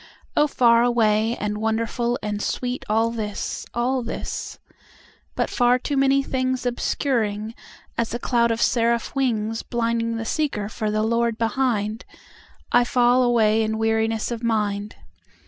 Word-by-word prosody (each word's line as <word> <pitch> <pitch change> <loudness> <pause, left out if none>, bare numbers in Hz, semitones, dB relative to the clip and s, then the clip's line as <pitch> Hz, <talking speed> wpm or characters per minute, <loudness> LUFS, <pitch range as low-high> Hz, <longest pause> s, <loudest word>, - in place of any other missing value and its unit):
Oh, 295 - +4
far 235 -4 +4
away 225 -1 +2
and 210 0 -3
wonderful 230 +2 -1
and 210 -1 -2
sweetAll 230 -2 -1
this, 210 -2 -4
all 250 +2 +1
this. 235 - -5 0.8
But - - -1
far 245 0 +3
too 280 +3 -3
many 275 0 +3
thingsObscuring, 245 -4 -1 0.5
as 235 - 0
a 240 - -2
cloud 235 -1 +1
of 230 0 +1
seraph 235 -1 +1
wingsBlinding 230 -1 -1
the 225 - -4
seeker 220 -7 -1
for 215 -1 -3
the 215 0 0
Lord 235 0 +1
behind,I 230 0 -2
fall 245 +1 +3
away 225 -3 +3
in 220 0 -1
weariness 225 0 0
of 235 -1 -4
mind. 210 -2 -1
230 Hz, 130 wpm, -23 LUFS, 220-245 Hz, 0.8 s, Oh